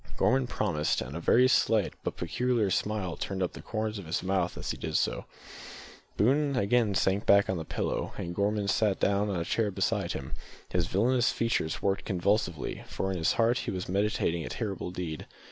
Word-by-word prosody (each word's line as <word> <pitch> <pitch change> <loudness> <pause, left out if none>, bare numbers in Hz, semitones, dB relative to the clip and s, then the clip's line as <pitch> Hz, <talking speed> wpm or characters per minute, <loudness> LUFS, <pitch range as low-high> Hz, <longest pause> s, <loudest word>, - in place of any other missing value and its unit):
Gorman 130 0 +2
promised, 85 -11 0
and 65 +3 -6
a - - -3
very 125 +8 +5
slight 110 -4 +2
but - - -3
peculiar 120 -5 0
smile 100 -3 -1
turned 95 -1 -3
up 90 - -2
the - - -9
corners 110 -1 -3
of 90 - -9
his 80 - -2
mouth 95 -1 0
as - - -3
he - - -5
did - - -1
so. - - -1 0.9
Boone 140 +6 +3
again 110 -2 +2
sank 95 +2 +1
back 100 0 +6
on 95 -2 -1
his 80 - -6
pillow, - - -2
and 85 - -4
Gorman 100 +2 0
sat 100 0 +2
down 100 +1 +2
on 95 -3 -1
a 85 - -2
chair 110 +2 +1
beside 95 -1 -1
him. 70 - -6 0.4
His 85 -2 0
villainous 120 +6 +2
features 115 -9 -1
worked 100 0 0
convulsively, 90 -4 -1
for 95 - -2
in 95 - -2
his 80 - +2
heart 115 +2 +2
he - - -4
was 90 -1 -3
meditating 95 -3 0
a - - -5
terrible 100 -6 -4
deed. 90 -4 -5
100 Hz, 195 wpm, -29 LUFS, 90-110 Hz, 0.9 s, back